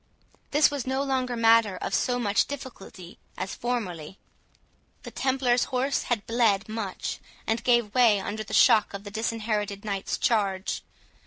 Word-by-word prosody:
This 295 0 +4
was 280 -3 -4
no 265 +1 0
longer 260 -3 -1
matter 225 -4 +4
of - - -4
so 245 -1 +1
much 215 -3 +1
difficulty 220 -10 -9 0.2
as 195 - -4
formerly. 190 -9 -4 0.9
The - - -8
Templars 260 -2 +1
horse 260 +2 -1
had 230 -4 -1
bled 225 -3 +2
much, 215 -3 -4 0.3
and 225 +1 -1
gave 240 -4 +2
way 235 -5 +5
under 210 +3 -4
the 200 - -12
shock 210 -2 +4
of 200 - -7
the 205 - -9
Disinherited 215 -2 -2
Knight's 200 -2 -2
charge. 200 -4 0
225 Hz, 150 wpm, -26 LUFS, 200-250 Hz, 0.9 s, way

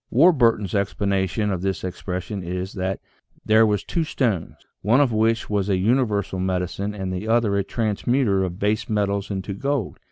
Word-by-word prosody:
Warburton's 115 - +4
explanation 100 +1 0
of 90 -2 -2
this 95 0 -2
expression 90 +1 -4
is, 90 +2 -4
that 95 0 -2 0.5
"there 110 +1 +5
was 105 -2 0
two 170 - -1
stones, 115 - -1 0.3
one 115 +6 +3
of 140 -4 +3
which 115 +1 +1
was 105 -1 -1
a 95 - +2
universal 105 -2 +1
medicine 95 +2 -2
and 95 -2 -4
the 90 +4 -4
other 115 -3 +2
a 100 - +1
transmuter 110 -1 0
of 90 -1 -4
base 105 +2 0
metals 100 -2 0
into 100 0 -4
gold." 135 0 -2
100 Hz, 165 wpm, -23 LUFS, 95-110 Hz, 0.5 s, there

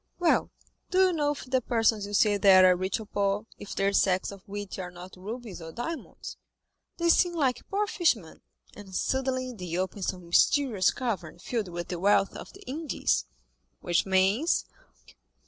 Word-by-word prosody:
"Well, 350 -2 +2 0.4
do 370 - -1
you - - -1
know 295 -3 +1
if 285 - -9
the 260 0 +1
persons 225 -3 +1
you 205 - -3
see 210 0 +4
there 190 -2 +7
are - - +3
rich 185 +4 -2
or 220 - -7
poor, 200 +1 -1
if 205 - -8
their 200 0 +1
sacks 190 -1 +2
of 200 -1 -11
wheat 205 -1 -6
are 180 -1 -5
not 180 +1 -11
rubies 210 0 -7
or 165 0 -8
diamonds? 310 - -6 0.6
They 340 0 +1
seem 345 +1 +4
like 270 -6 -1
poor 410 +2 +1
fishermen, 310 - 0 0.3
and 195 -2 -10
suddenly 255 +1 -1
they 180 -5 -5
open 190 +2 -3
some 180 -1 -3
mysterious 210 +3 +3
cavern 200 - -3
filled 215 +3 -3
with 175 0 -6
the 175 - -3
wealth 195 +1 +3
of - - -9
the - - -14
Indies." 300 +4 -1 0.5
"Which 175 +2 +1
means?" 195 - +2
205 Hz, 175 wpm, -28 LUFS, 185-255 Hz, 0.6 s, there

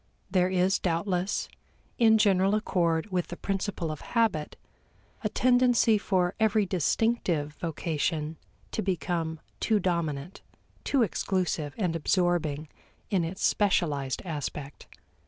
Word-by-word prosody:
There 180 -1 +3
is 185 +1 +2
doubtless 180 +2 -1 0.5
in 220 -2 +6
general 195 -1 +3
accord 175 -3 0
with 180 -2 0
the 175 - -7
principle 195 -4 -2
of 155 - -7
habit 220 -11 0 0.7
a - - +1
tendency 245 -3 +4
for 185 -3 +1
every 215 -1 +3
distinctive 180 -4 0
vocation 160 -1 -2 0.3
to - - -2
become 170 -3 -2 0.2
too 220 -2 +2
dominant, 170 -3 -2 0.4
too 275 -4 +2
exclusive 175 -7 -1
and 180 -6 0
absorbing 165 -3 0 0.4
in 190 -4 +2
its 170 +4 -4
specialized 150 -10 +1
aspect. 145 -3 -5
180 Hz, 115 wpm, -28 LUFS, 160-200 Hz, 0.7 s, in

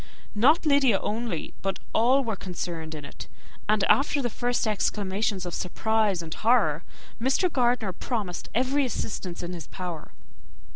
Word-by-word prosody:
Not 280 +11 +4
Lydia 280 -8 +4
only, 220 -6 -3
but 195 0 -1 0.2
all 255 +5 +4
were 225 -4 -2
concerned 170 -4 -5
in 150 -2 -7
it; - - -9 0.4
and 215 -1 +3
after 285 +1 +3
the 240 -4 -1
first 245 +1 0
exclamations 205 -2 0
of 175 - -4
surprise 210 -1 0
and 160 -1 -5
horror, 210 -10 +2 0.4
Mr. 275 +8 +2
Gardiner 240 -4 +2
readily 175 - -11
promised 210 -8 -3
every 260 +4 +2
assistance 195 -8 -4
in 175 +1 -4
his 165 -5 -7
power. 175 -4 -6
215 Hz, 150 wpm, -27 LUFS, 180-245 Hz, 0.4 s, Not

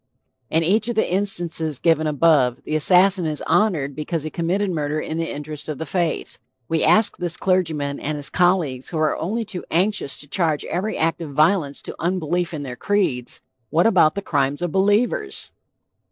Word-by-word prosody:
In 165 +1 +1
each 215 +7 +1
of 240 - -2
the 220 - +1
instances 175 -5 0
given 160 0 +2
above, 145 -5 +2
the 155 - -3
assassin 180 +3 +5
is 150 -2 -3
honored 155 -10 +1
because 155 +1 -3
he 155 - -5
committed 185 +4 -1
murder 150 -2 -2
in 160 +1 -4
the 165 - -2
interest 150 +1 -6
of 150 - -4
the 160 - -5
faith. 170 +1 -2 0.3
We 160 +2 0
ask 215 0 +4
this 175 -1 -2
clergyman 160 -7 0
and 155 +1 -3
his 145 -1 -2
colleagues 175 -8 +1
who 165 - -4
are 155 -1 +1
only 220 +7 -3
too 195 -4 -4
anxious 185 -3 0
to 145 - -7
charge 160 -2 0
every 200 +5 -3
act 165 +1 0
of 150 -4 -6
violence 155 -1 +1
to - - -6
unbelief 175 0 -1
in 150 -3 -5
their 125 -3 -6
creeds 160 -10 -1 0.3
What 165 +4 +2
about 185 -8 +4
the 200 - -4
crimes 140 +1 0
of 175 - -2
believers? 205 - 0
165 Hz, 185 wpm, -21 LUFS, 150-185 Hz, 0.3 s, assassin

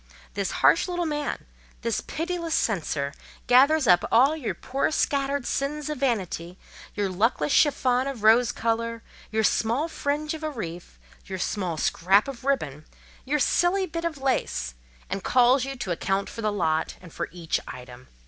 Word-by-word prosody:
This 200 -2 -1 0.2
harsh 335 - +5
little 350 -1 -1
man—this 295 -6 -4
pitiless 335 0 -3
censor—gathers 240 - +1
up 180 -5 +5
all 265 +7 +5
your 290 -7 -3
poor 270 +2 -1
scattered 280 -3 0
sins 295 +2 -2
of 300 - -5
vanity, 185 -9 -2 0.4
your 205 -1 0
luckless 185 -5 +1
chiffon 260 -3 +3
of 260 -6 -5
rose 230 +2 +5
colour, 230 0 -2 0.3
your 220 0 +1
small 235 +8 +1
fringe 300 0 -2
of 315 - -7
a 310 - -2
wreath, 175 - -7 0.3
your 190 -1 -4
small 180 -3 -2
scrap 190 - +3
of 265 -3 -7
ribbon, 155 - -1 0.4
your 290 +3 +1
silly 350 +7 +2
bit 335 -1 -5
of 335 -3 -2
lace, 250 - -1 0.3
and 195 0 -4
calls 255 +1 +4
you 275 0 -5
to 225 -8 -4
account 195 +3 -1
for 230 - -7
the 215 -1 0
lot, 160 -5 0
and 180 -3 -14
for - - -4
each 170 -2 -2
item. 125 0 -10
240 Hz, 160 wpm, -26 LUFS, 190-285 Hz, 0.4 s, harsh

